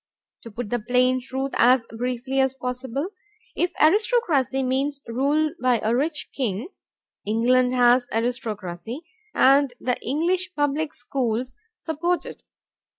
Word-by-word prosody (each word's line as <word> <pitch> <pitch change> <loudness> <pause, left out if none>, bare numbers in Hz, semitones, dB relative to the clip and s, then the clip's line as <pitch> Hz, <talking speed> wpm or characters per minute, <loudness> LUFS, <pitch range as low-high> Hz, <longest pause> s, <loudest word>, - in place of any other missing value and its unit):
To 230 - -10
put 225 0 -6
the 245 - +1
plain 255 +3 +2
truth 265 +2 -4
as 250 0 +5
briefly 250 +3 -2
as 265 0 +2
possible, 255 +4 -4 0.5
if 350 - 0
aristocracy 315 - +2
means 270 +2 0
rule 290 +6 +1
by 250 -2 +3
a 220 +2 +2
rich 295 +4 -1
ring, 235 - -1 0.5
England 250 +4 +2
has 245 0 +4
aristocracy 225 - -3 0.3
and 275 -1 +4
the 250 -1 -1
English 350 +8 0
public 290 +1 -1
schools 245 -1 -2 0.2
support 340 +3 -1
it. - - -10
255 Hz, 125 wpm, -24 LUFS, 245-290 Hz, 0.5 s, as